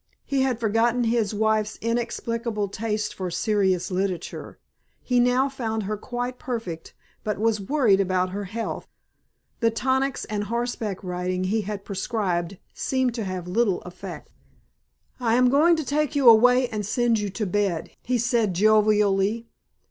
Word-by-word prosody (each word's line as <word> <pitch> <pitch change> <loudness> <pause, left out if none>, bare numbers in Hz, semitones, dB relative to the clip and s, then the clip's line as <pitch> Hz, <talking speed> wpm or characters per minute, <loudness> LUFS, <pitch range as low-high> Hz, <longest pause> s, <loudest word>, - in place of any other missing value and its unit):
He 275 -1 0
had 260 -3 0
forgotten 230 +2 +2
his 225 -3 +1
wife's 215 0 0
inexplicable 230 -2 -2
taste 215 +1 -2
for 185 -1 -4
serious 190 0 0
literature. 185 -2 -3 0.5
He 250 -1 +2
now 250 +2 +3
found 225 -5 -3
her 210 +2 -2
quite 245 +3 -5
perfect 225 -10 -5 0.3
but 210 -1 -2
was 215 0 +1
worried 215 -3 +3
about 185 -1 +1
her 200 +1 -4
health. 225 +5 -5 0.7
The 230 - +3
tonics 260 +3 0
and 210 -1 -3
horseback 230 -3 -3
riding 180 0 -2
he 210 +4 0
had 200 -1 -6
prescribed 195 -3 -2 0.2
seemed 260 -2 0
to 225 -3 -3
have 185 -2 -4
little 200 0 +1
effect. 180 - -9 0.9
"I 235 -2 +2
am 250 0 +4
going 320 +5 +5
to 315 -2 -3
take 300 +1 0
you 275 -3 +3
away 250 +3 +7
and 210 -1 -3
send 230 +2 +1
you 205 -1 -2
to 210 +3 -3
bed," 195 -3 -1
he 250 +1 0
said 230 -5 +1
jovially. 210 +1 +3
220 Hz, 150 wpm, -24 LUFS, 195-240 Hz, 0.9 s, away